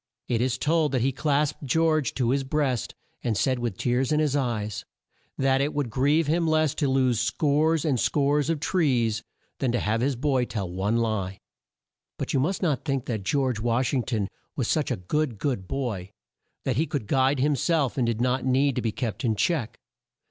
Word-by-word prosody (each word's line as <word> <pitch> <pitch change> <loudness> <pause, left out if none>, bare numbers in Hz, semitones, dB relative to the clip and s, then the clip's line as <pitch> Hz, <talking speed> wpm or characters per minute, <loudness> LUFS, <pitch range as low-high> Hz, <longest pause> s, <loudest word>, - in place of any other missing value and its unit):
It 120 -2 0
is 125 -1 0
told 155 -1 +1
that 130 - +1
he 135 - +2
clasped 145 +2 0
George 155 0 +1
to 125 -2 +1
his 135 0 +1
breast, 135 - -1 0.3
and 115 -4 0
said 130 +3 +1
with 120 -6 -3
tears 125 +2 0
in 150 - +3
his 150 -2 +1
eyes; 110 -7 -2 0.5
that 135 0 +2
it 145 +2 -1
would 140 -6 -1
grieve 145 +6 +2
him 165 +3 +1
less 155 -2 +2
to 145 - 0
lose 130 -3 +2
scores 150 +5 +1
and 135 -6 +1
scores 145 +3 +2
of 165 -2 0
trees, 125 - +1 0.4
than 130 -3 +1
to 120 - +1
have 110 +2 0
his 135 +1 +1
boy 130 -1 +1
tell 100 -6 -4
one 95 +6 -1
lie. 105 -5 -1 0.8
But - - -3
you 135 - +3
must 185 +9 0
not 150 -8 +1
think 135 -4 -1
that 110 -4 -2
George 130 +1 0
Wash 120 +3 0
ing 130 - +2
ton 110 -5 -2 0.3
was - - -1
such - - +1
a - - 0
good 130 +6 -1
good 100 -6 -2
boy 110 -9 -3 0.6
that 130 -3 0
he 160 +3 +1
could 140 -8 -3
guide 135 +5 +2
him 145 +3 +2
self, 145 0 +1
and 125 -3 +1
did 115 -1 -1
not 125 +1 +1
need 135 +1 +2
to - - +1
be 115 - -1
kept 115 +4 -4
in 115 -3 +1
check. 120 0 0
130 Hz, 205 wpm, -26 LUFS, 115-145 Hz, 0.8 s, in